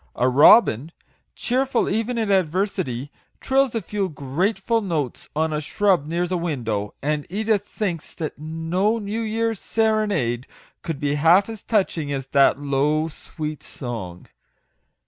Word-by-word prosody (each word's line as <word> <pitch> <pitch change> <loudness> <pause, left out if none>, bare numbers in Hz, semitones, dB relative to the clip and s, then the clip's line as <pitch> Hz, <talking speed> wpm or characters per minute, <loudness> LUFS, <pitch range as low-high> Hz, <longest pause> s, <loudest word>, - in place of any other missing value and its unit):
A 125 - +2
robin, 140 - +6 0.4
cheerful 255 0 0
even 230 +2 -1
in 220 -3 0
adversity, 180 - 0 0.3
trills 265 -2 +1
a 225 - -1
few 195 +1 -2
grateful 190 - -1
notes 160 - -3
on 160 +1 0
a 150 - -1
shrub 180 -1 +1
near 170 +2 0
the 180 0 -2
window, 115 -11 -2
and 150 0 -1
Edith 210 +1 0
thinks 175 -7 -4
that 155 -3 -5
no 165 +7 0
new 215 +1 -3
year's 225 -1 -1
serenade 210 - 0 0.3
could 160 -4 -4
be 145 -1 0
half 170 +8 +4
as 220 -3 -7
touching 175 -9 0
as 135 -2 -3
that 140 -2 +4
low, 145 +3 +1
sweet 155 -1 -6
song. 105 -9 -7
165 Hz, 140 wpm, -23 LUFS, 145-210 Hz, 0.4 s, robin